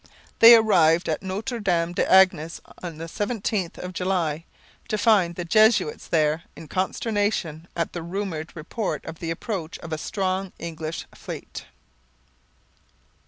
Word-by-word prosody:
They 230 +1 +11
arrived 175 -7 +4
at 155 - -1
Notre 210 +6 -4
Dame 175 -4 0
des - - 0
Anges 185 -4 +4 0.2
on 170 -3 -6
the 165 - -6
17th 205 0 -2
of 180 0 -6
July, 170 -4 -1 0.4
to 215 -2 -1
find 205 -5 +3
the 175 - -4
Jesuits 215 -3 +3
there 155 0 +2
in 165 - -11
consternation 190 -3 -1
at 170 -1 -2
the 175 - -4
rumoured 170 -2 -4
report 175 +6 -4
of 160 - -8
the 165 - -4
approach 165 -1 -4
of 165 -2 -7
a 155 - -3
strong 190 0 -2
English 160 -1 -5
fleet. - - -8
175 Hz, 140 wpm, -24 LUFS, 165-205 Hz, 0.4 s, They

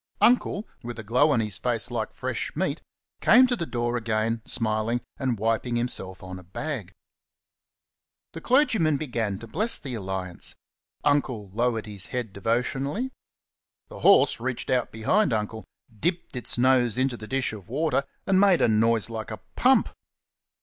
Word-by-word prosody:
Uncle, 230 -3 +3
with 120 0 -7
a 110 - -6
glow 125 +8 +3
on 130 -6 +3
his 105 -3 -2
face 120 -1 0
like 115 -2 -2
fresh - - -4
meat, - - -1 0.4
came 250 +4 +7
to 250 -1 +1
the 170 -8 -3
door 120 0 -1
again, 115 0 -1
smiling, 110 +1 0 0.2
and 130 -4 0
wiping 115 +3 0
himself 95 -7 -2
on 95 0 -7
a - - -13
bag. 105 - -5 1.4
The 165 - -7
clergyman 220 - +3
began 115 -9 -2
to 115 - -9
bless 210 - 0
the 135 -5 -7
alliance. 95 -4 -4 0.5
Uncle 125 -9 0
lowered 115 0 0
his 100 -3 -7
head 120 -5 -4
devotionally. 135 - -1 0.8
The - - -10
horse 145 -12 +5
reached 125 0 -3
out 125 -2 +1
behind 125 - +2
Uncle, 110 0 -3 0.3
dipped 175 - -2
its 125 - -1
nose 125 -2 +3
into 130 -1 +1
the 110 -2 -9
dish 135 -2 -1
of 100 -2 -10
water, 145 +1 +1 0.2
and 190 -1 +3
made 195 -4 +5
a - - +5
noise 115 0 +3
like 110 -2 -6
a - - -5 0.2
pump. - - +4
120 Hz, 160 wpm, -26 LUFS, 110-140 Hz, 1.4 s, came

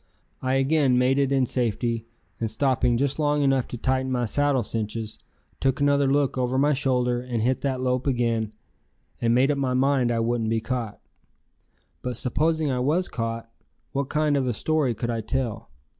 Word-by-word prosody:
I 130 0 0
again 135 -1 +3
made 130 +2 +3
it 140 -1 +1
in 135 -2 +3
safety, 115 -1 -1 0.3
and 115 - -1
stopping 125 0 +1
just 140 +3 0
long 145 -1 +2
enough 135 -2 +2
to 120 - -6
tighten 130 +2 0
my 125 -1 0
saddle 140 +2 +1
cinches, 110 0 -4 0.4
took 135 +1 +1
another 140 -1 +3
look 140 -2 +1
over 125 +1 0
my 145 +2 +3
shoulder 125 -3 +1
and 120 -3 -2
hit 130 +2 +1
that 130 -2 -1
lope 125 +1 0
again 115 -4 0 0.7
and 115 0 +3
made 135 +3 +4
up 140 - -1
my 130 -2 0
mind 130 -2 +2
I 115 - 0
wouldn't 115 -1 0
be 115 0 +1
caught. 115 -2 -4 1.0
But 125 -2 -4
supposing 155 +4 +1
I 125 - -1
was 155 +8 +1
caught, 115 0 -4 0.4
what 140 0 -2
kind 150 -1 +1
of 135 -2 +1
a 120 - 0
story 145 0 0
could 120 +2 -2
I 115 -1 -2
tell? 110 - -3
130 Hz, 185 wpm, -25 LUFS, 115-140 Hz, 1.0 s, made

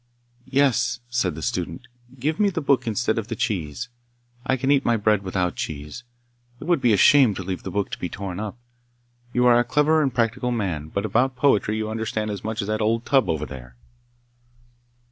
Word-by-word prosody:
'Yes,' 130 -3 +2
said 95 -10 0
the 80 - -7
student, 90 -1 -3 0.3
'give 150 +5 -1
me 205 -1 +4
the 180 -4 -2
book 135 -5 +1
instead 115 0 0
of 110 - -5
the 115 - -4
cheese. 95 +2 -2 0.6
I 130 - +2
can 135 +2 +1
eat 140 -1 +4
my 120 -1 +2
bread 105 -1 +2
without 90 -3 -1
cheese. 75 - -6 0.6
It - - -8
would 170 -2 +1
be 120 - +4
a 105 - +4
shame 130 -2 +6
to 95 - -5
leave 90 0 -4
the - - -6
book 100 -2 -2
to - - -5
be 90 - -3
torn 95 +1 -5
up. 110 +1 -5 0.7
You 125 0 +2
are 120 -1 +6
a - - +3
clever 150 +5 +3
and 140 -3 +1
practical 120 +1 0
man, 95 -11 -2
but 100 +6 -3
about 125 +5 +1
poetry 110 -5 +2
you 110 0 -2
understand 110 -1 -2
as 100 -2 -6
much 110 0 -2
as - - -6
that 110 +1 -1
old 115 +2 +1
tub 135 0 +3
over 75 -2 -1
there! 60 -3 -10
110 Hz, 205 wpm, -23 LUFS, 100-125 Hz, 0.7 s, shame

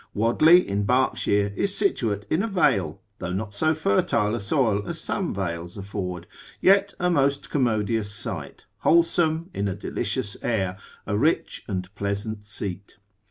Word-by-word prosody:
Wadley 155 - +5
in 100 +1 -1
Berkshire 100 -5 +1
is 200 - 0
situate 110 - 0
in 160 - +1
a 225 - -1
vale, 130 - +1 0.2
though 90 - -4
not 105 +2 -4
so 155 +10 +2
fertile 105 -5 +1
a 120 - -1
soil 110 -1 +1
as - - -3
some - - -1
vales 85 -2 -4
afford, 95 -3 -5 0.3
yet 200 +1 +4
a 180 0 +1
most 140 -3 +1
commodious 110 -5 0
site, - - -5
wholesome, 165 +1 +2
in 100 - -1
a 95 - -2
delicious 100 - -2
air, 95 -6 -1 0.3
a 100 - -1
rich 150 +10 0
and 95 -2 -4
pleasant 105 +1 -3
seat. 100 -2 -6
105 Hz, 150 wpm, -25 LUFS, 100-150 Hz, 0.3 s, Wadley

